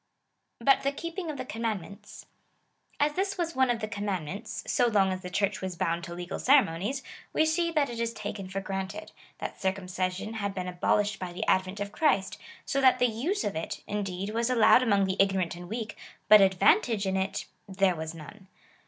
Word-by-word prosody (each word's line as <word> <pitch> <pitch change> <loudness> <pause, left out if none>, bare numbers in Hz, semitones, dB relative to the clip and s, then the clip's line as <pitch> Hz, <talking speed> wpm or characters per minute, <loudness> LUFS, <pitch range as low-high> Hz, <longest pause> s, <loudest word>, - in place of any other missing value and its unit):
But 270 +4 +4
the 275 - +1
keeping 335 +4 -5
of 300 - -4
the - - -5
commandmetits. 215 -5 -5 0.7
As 295 +1 +2
this 390 +3 -1
was 335 -2 -2
one 260 -1 +3
of 235 -2 0
the 215 - -2
commandments, 200 -2 -4
so 245 - +2
long 195 -4 +3
as 185 - -5
the 180 - -6
Church 200 +2 0
was 185 -2 -4
bound 170 -1 -1
to 170 -1 -7
legal 175 0 -5
ceremonies, 260 - +3 0.3
we 315 - +3
see 335 +2 +1
that 300 -3 +2
it 235 -2 -6
is 230 0 0
taken 205 -3 -6
for 195 +1 -3
granted, 195 +2 -5 0.3
that - - -6
circumcision 190 +1 -2
had 200 -3 -3
been 185 -1 -3
abolished 195 +3 +1
by 185 -1 -5
the 175 - -4
advent 185 +2 +1
of 205 0 -4
Christ, 235 -11 +1 0.3
so 275 - 0
that 260 -1 +6
the 250 - +3
tise 310 - -1
of 200 - -2
it, 160 - -4
indeed, 195 -1 -3
was 230 +2 0
allowed 250 0 +6
among 200 -5 +3
the 190 0 -2
ignorant 190 -3 +1
and 175 0 -10
weak, 220 -1 -4 0.3
but 215 -1 +9
advantage 200 - +3
in 190 0 0
it 190 0 -2
— 180 - -43
there 190 -2 +4
was 160 0 -5
none. 190 +5 -12
205 Hz, 200 wpm, -28 LUFS, 185-240 Hz, 0.7 s, but